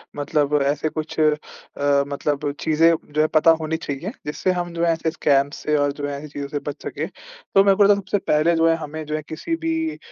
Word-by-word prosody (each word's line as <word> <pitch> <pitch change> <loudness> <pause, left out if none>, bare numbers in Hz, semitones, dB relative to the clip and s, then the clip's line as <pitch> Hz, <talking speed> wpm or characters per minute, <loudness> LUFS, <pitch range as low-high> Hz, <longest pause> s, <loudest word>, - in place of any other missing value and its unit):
मतलब 145 0 0
ऐसे 145 +2 0
कुछ 155 +1 -5
अ, 155 -1 +5 0.7
मतलब 145 0 -2
चीज़ें 160 +1 +4 0.2
जो 155 - +2
है 155 - +3
पता 160 +1 +6
होनी 160 +1 -1
चाहिए 160 +6 -5
जिससे 150 +5 -1
हम 175 -1 -3
जो 170 0 -2
है 170 - +3
ऐसे 160 0 -2
स्कैम 140 -2 +2
से 150 - -1
और 145 0 +2
जो 145 0 -5
है 140 -1 -4
ऐसी 150 +2 -8
चीज़ों 140 -1 -6
से 145 0 -3
बच 145 - -8
सके। - - -3
तो - - -1
मेरे 195 -1 +4
को 200 0 +5
सबसे 200 +1 -1
पहले 165 -2 +2
जो 165 0 +3
है 165 - +3
हमें 155 0 -6
जो 155 +1 -3
है 155 - -2
किसी 250 - -3
भी 325 -1 -1
155 Hz, 225 wpm, -22 LUFS, 145-170 Hz, 0.7 s, पता